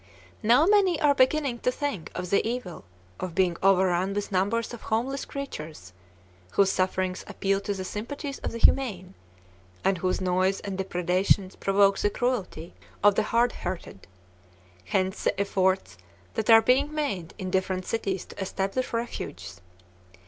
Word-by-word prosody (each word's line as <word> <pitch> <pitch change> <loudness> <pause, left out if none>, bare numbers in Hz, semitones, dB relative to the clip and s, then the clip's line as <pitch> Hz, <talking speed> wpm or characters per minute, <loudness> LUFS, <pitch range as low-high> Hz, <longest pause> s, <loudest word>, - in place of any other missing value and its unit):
Now 240 +7 +5
many 385 -4 +4
are 290 -1 +4
beginning 265 -1 +2
to 250 - +1
think 265 - -4
of 180 0 -4
the 200 - +3
evil 230 - -4 0.3
of 180 -3 -5
being 185 -2 +2
overrun 190 0 +3
with 205 0 -3
numbers 205 +6 0
of 235 - -8
homeless 250 +5 -2
creatures, 155 - -7 0.6
whose 195 -1 +4
sufferings 185 0 -1
appeal 195 0 0
to 200 0 -3
the 190 - -4
sympathies 275 +9 -5
of - - -4
the 230 - -5
humane, 200 -7 +2 0.7
and 195 -2 +2
whose 185 +1 0
noise 185 +1 +1
and 195 -1 -5
depredations 185 +1 +1
provoke 195 0 +3
the 205 - +2
cruelty 205 -9 -3 0.3
of 205 0 +7
the 210 - +2
hard 235 +1 +3
hearted: 175 - -7 0.8
hence 185 - -1
the - - +1
efforts 190 - 0 0.3
that 220 +1 -2
are 225 0 +8
being 275 +4 +3
made 210 - -3
in 185 -1 -5
different 185 -1 -1
cities 195 -5 -2
to - - -10
establish 195 +6 -2
refuges. 90 - -5
195 Hz, 150 wpm, -26 LUFS, 185-240 Hz, 0.8 s, are